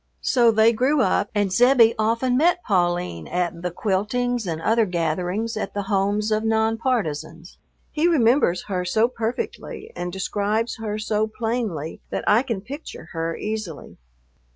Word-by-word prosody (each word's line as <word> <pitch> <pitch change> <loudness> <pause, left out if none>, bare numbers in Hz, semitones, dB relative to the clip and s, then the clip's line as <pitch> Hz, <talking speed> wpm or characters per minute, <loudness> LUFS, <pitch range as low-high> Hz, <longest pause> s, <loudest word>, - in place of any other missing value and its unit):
So 240 -3 +4
they 220 +1 +4
grew 260 +5 +2
up, 195 +1 +1
and 205 -2 +1
Zebbie 240 +1 +5
often 230 +3 +1
met 350 +6 +3
Pauline 175 - 0
at 175 -1 -2
the 180 - -2
quiltings 215 +5 -1
and 160 -2 -2
other 225 +5 +2
gatherings 180 +6 -1
at 215 - -4
the 205 - -1
homes 205 +2 0
of 215 0 +1
non 220 0 +1
partisans. 170 - -3 0.3
He 315 +2 +1
remembers 245 - +3
her 185 -3 -2
so 220 +6 +2
perfectly 250 - -5
and 175 0 -4
describes 205 +4 -1
her 215 -2 -4
so 215 0 0
plainly 220 -9 -3
that - - -3
I 215 +3 +5
can 230 -7 -3
picture 280 +9 -9
her 165 0 -2
easily. 210 -8 -6
215 Hz, 155 wpm, -23 LUFS, 180-235 Hz, 0.3 s, Zebbie